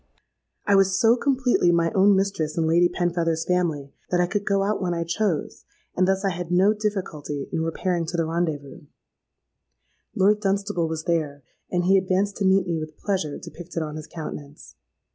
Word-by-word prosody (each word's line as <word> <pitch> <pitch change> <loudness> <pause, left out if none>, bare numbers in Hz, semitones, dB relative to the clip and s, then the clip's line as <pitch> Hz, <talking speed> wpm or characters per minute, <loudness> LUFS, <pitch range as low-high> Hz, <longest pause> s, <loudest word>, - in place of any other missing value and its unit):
I 205 - +3
was 195 -1 +4
so 230 +1 +5
completely 255 -8 +2
my 170 -1 +2
own 200 +1 +5
mistress 190 -6 -1
in 165 - +2
Lady 170 +2 +4
Penfeather's 170 -2 -1
family, 160 -6 -1 0.2
that 180 - +1
I 175 - +4
could 200 +3 -3
go 195 -1 +2
out 205 +1 -1
when 175 -2 -1
I 170 - -1
chose; 170 0 -2 0.3
and 185 0 +2
thus 195 +1 +1
I 195 - +2
had 175 -1 -5
no 185 +4 +4
difficulty 180 -9 -4
in 160 - 0
repairing 165 +1 -1
to 175 - -3
the 165 - +1
rendez 165 -2 -1
vous. 140 +1 -13 1.3
Lord 205 +1 +3
Dunstable 195 -3 0
was 160 0 -4
there; 155 -5 -1 0.3
and 175 -1 0
he 190 +2 +5
advanced 190 +2 0
to 200 - -1
meet 190 0 +4
me 170 -3 -1
with 155 0 -8
pleasure 185 -8 -2
depicted 175 -1 -6
on 150 -1 -6
his 155 -1 -7
countenance. 150 -3 -8
175 Hz, 185 wpm, -24 LUFS, 160-195 Hz, 1.3 s, so